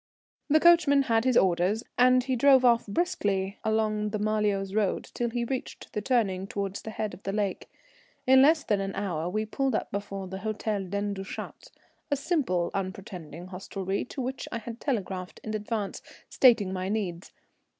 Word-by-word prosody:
The 310 Hz, +2 st, +5 dB
coachman 310 Hz, -5 st, +5 dB
had 225 Hz, -2 st, +1 dB
his 255 Hz, -2 st, +4 dB
orders, 190 Hz, +5 st, +2 dB
and 255 Hz, 0 st, +5 dB
he 260 Hz, 0 st, -1 dB
drove 265 Hz, +1 st, +5 dB
off 235 Hz, -2 st, +4 dB
briskly 200 Hz, -, -1 dB
along 215 Hz, -1 st, 0 dB
the 215 Hz, -, -2 dB
Marlioz 205 Hz, -2 st, 0 dB
road 210 Hz, -3 st, +1 dB
till 240 Hz, -1 st, -1 dB
he 235 Hz, 0 st, -2 dB
reached 260 Hz, +1 st, -5 dB
the 210 Hz, -, -2 dB
turning 200 Hz, -6 st, +1 dB
towards 200 Hz, -1 st, -4 dB
the -, -, -7 dB
head 215 Hz, -1 st, -3 dB
of -, -, -11 dB
the 195 Hz, -, -3 dB
lake. 200 Hz, -2 st, -2 dB, 0.6 s
In 260 Hz, 0 st, +7 dB
less 310 Hz, +2 st, +5 dB
than 205 Hz, -2 st, +1 dB
an 195 Hz, 0 st, -4 dB
hour 175 Hz, -4 st, -2 dB
we 215 Hz, +3 st, -1 dB
pulled 265 Hz, +2 st, -1 dB
up -, -, -2 dB
before 195 Hz, -1 st, -4 dB
the 190 Hz, +1 st, -6 dB
Hôtel 210 Hz, -2 st, -2 dB
Dent 200 Hz, +1 st, -1 dB
du 195 Hz, -, -4 dB
Chat, 195 Hz, -, -8 dB, 0.4 s
a 285 Hz, -, +2 dB
simple, 265 Hz, -, 0 dB
unpretending 185 Hz, -3 st, -6 dB
hostelry, 190 Hz, +1 st, -3 dB
to 265 Hz, -, -6 dB
which 260 Hz, +1 st, -4 dB
I 230 Hz, -, -2 dB
had 230 Hz, +1 st, -8 dB
telegraphed 190 Hz, -9 st, -3 dB
in 215 Hz, -, -4 dB
advance, 210 Hz, -1 st, -3 dB, 0.3 s
stating 225 Hz, -7 st, +4 dB
my 185 Hz, 0 st, -3 dB
needs. 190 Hz, -5 st, -3 dB
210 Hz, 180 wpm, -28 LUFS, 195-245 Hz, 0.6 s, In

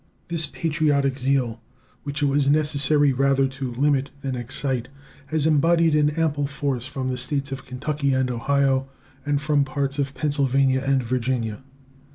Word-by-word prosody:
This 165 Hz, -2 st, 0 dB
patriotic 145 Hz, -4 st, 0 dB
zeal, 125 Hz, -4 st, 0 dB, 0.4 s
which 145 Hz, 0 st, -3 dB
it -, -, +4 dB
was 140 Hz, 0 st, +2 dB
necessary 145 Hz, -1 st, +3 dB
rather 135 Hz, +1 st, +2 dB
to 135 Hz, -1 st, -5 dB
limit 140 Hz, +2 st, +1 dB
than 135 Hz, -2 st, -3 dB
excite, 125 Hz, 0 st, -3 dB, 0.4 s
has 155 Hz, 0 st, 0 dB
embodied 165 Hz, +1 st, +3 dB
an 150 Hz, -1 st, +4 dB
ample 145 Hz, -3 st, +1 dB
force 140 Hz, -3 st, -3 dB
from 130 Hz, -1 st, -4 dB
the 125 Hz, -1 st, -2 dB
States 140 Hz, +1 st, -1 dB
of 135 Hz, 0 st, -6 dB
Kentucky 140 Hz, +2 st, -2 dB
and 130 Hz, -1 st, +1 dB
Ohio 135 Hz, +2 st, +1 dB, 0.4 s
and 145 Hz, -1 st, +1 dB
from 145 Hz, -1 st, +2 dB
parts 140 Hz, +1 st, -2 dB
of 140 Hz, -1 st, -2 dB
Pennsylvania 135 Hz, -3 st, +1 dB
and 135 Hz, -1 st, +1 dB
Virginia. 120 Hz, -1 st, -2 dB
140 Hz, 155 wpm, -23 LUFS, 130-145 Hz, 0.4 s, it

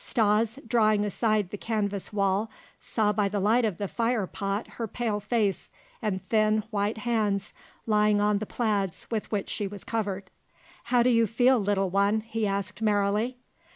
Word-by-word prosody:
Stas, 220 Hz, +1 st, +1 dB
drawing 215 Hz, -3 st, +3 dB
aside 210 Hz, -1 st, 0 dB
the 205 Hz, -, -6 dB
canvas 205 Hz, -3 st, -2 dB
wall, 200 Hz, +1 st, +1 dB, 0.3 s
saw 210 Hz, -2 st, 0 dB
by 205 Hz, -2 st, +1 dB
the 205 Hz, 0 st, -1 dB
light 220 Hz, +5 st, +3 dB
of 205 Hz, -6 st, -1 dB
the 200 Hz, -, -2 dB
fire 230 Hz, -1 st, 0 dB
pot 195 Hz, +3 st, -3 dB, 0.2 s
her 225 Hz, -, -1 dB
pale 220 Hz, -1 st, -2 dB
face, 210 Hz, -2 st, -1 dB, 0.3 s
and 190 Hz, -4 st, -2 dB
thin, 215 Hz, 0 st, +2 dB
white 205 Hz, +1 st, 0 dB
hands 210 Hz, -3 st, -1 dB, 0.3 s
lying 210 Hz, -1 st, +3 dB
on 205 Hz, 0 st, +2 dB
the 215 Hz, -, -5 dB
plaids 205 Hz, -6 st, -1 dB
with 220 Hz, -2 st, -3 dB
which 205 Hz, -3 st, -1 dB
she 205 Hz, -, -2 dB
was 200 Hz, -1 st, -9 dB
covered. 200 Hz, -4 st, -3 dB, 0.5 s
"How 245 Hz, 0 st, +3 dB
do 250 Hz, -, +4 dB
you 230 Hz, -1 st, +4 dB
feel, 245 Hz, +4 st, +3 dB
little 195 Hz, -2 st, 0 dB
one?" 200 Hz, +3 st, +2 dB
he 225 Hz, -1 st, -2 dB
asked 195 Hz, 0 st, -3 dB
merrily. 210 Hz, +3 st, +1 dB
210 Hz, 170 wpm, -27 LUFS, 200-225 Hz, 0.5 s, do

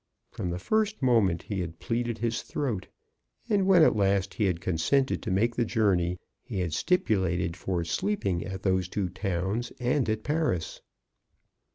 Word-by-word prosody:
From 90 Hz, -, -4 dB
the 85 Hz, -, -2 dB
first 215 Hz, -, 0 dB
moment 105 Hz, -9 st, +3 dB
he 100 Hz, -3 st, -3 dB
had 85 Hz, -2 st, -4 dB
pleaded 120 Hz, +1 st, -2 dB
his 115 Hz, 0 st, -1 dB
throat, 115 Hz, -10 st, -3 dB, 0.6 s
and 200 Hz, -4 st, +2 dB
when 185 Hz, -4 st, +7 dB
at -, -, +5 dB
last 100 Hz, -1 st, +1 dB
he 110 Hz, -, 0 dB
had 90 Hz, -3 st, 0 dB
consented 130 Hz, -, +1 dB
to -, -, -4 dB
make 110 Hz, +5 st, +1 dB
the 120 Hz, -, +2 dB
journey, 90 Hz, -6 st, +1 dB, 0.2 s
he 95 Hz, -, -4 dB
had 85 Hz, -3 st, -2 dB
stipulated 95 Hz, -, +1 dB
for 90 Hz, -2 st, -2 dB
sleeping 90 Hz, -, -1 dB
at 95 Hz, 0 st, -6 dB
those 95 Hz, -2 st, +1 dB
two 95 Hz, -2 st, -2 dB
towns 95 Hz, +5 st, -2 dB
and 125 Hz, 0 st, +1 dB
at 110 Hz, 0 st, -1 dB
Paris. 150 Hz, -, -1 dB
100 Hz, 165 wpm, -28 LUFS, 90-120 Hz, 0.6 s, when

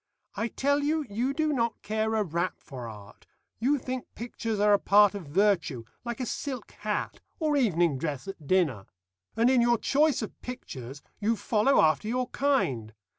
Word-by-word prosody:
I 210 Hz, +3 st, -1 dB
tell 285 Hz, +4 st, +1 dB
you, 305 Hz, +1 st, 0 dB
you 240 Hz, +6 st, 0 dB
do 310 Hz, +1 st, 0 dB
not 230 Hz, -3 st, 0 dB
care 220 Hz, +1 st, 0 dB
a 215 Hz, -, +2 dB
rap 170 Hz, 0 st, -2 dB
for 125 Hz, -4 st, -9 dB
art. 105 Hz, -2 st, -13 dB, 0.3 s
You 270 Hz, +6 st, +2 dB
think 255 Hz, -1 st, -5 dB
pictures 230 Hz, -2 st, -4 dB
are 210 Hz, 0 st, +5 dB
a 200 Hz, -, +5 dB
part 205 Hz, 0 st, +5 dB
of 195 Hz, -6 st, -7 dB
virtue, 170 Hz, -, +1 dB, 0.2 s
like 240 Hz, 0 st, -4 dB
a 255 Hz, -, -1 dB
silk 275 Hz, 0 st, -5 dB
hat -, -, -2 dB, 0.2 s
or 305 Hz, -3 st, +1 dB
evening 175 Hz, -, +2 dB
dress 145 Hz, -1 st, -3 dB
at 185 Hz, -7 st, -8 dB
dinner. 150 Hz, -, +1 dB, 0.5 s
And 230 Hz, +1 st, +4 dB
in 255 Hz, -1 st, +5 dB
your 240 Hz, 0 st, +4 dB
choice 285 Hz, +1 st, +2 dB
of -, -, -8 dB
pictures 140 Hz, -, -8 dB, 0.2 s
you 220 Hz, +2 st, +1 dB
follow 225 Hz, +5 st, +2 dB
after 155 Hz, +5 st, +2 dB
your 250 Hz, +2 st, -1 dB
kind. 130 Hz, -, 0 dB
215 Hz, 175 wpm, -28 LUFS, 165-255 Hz, 0.5 s, are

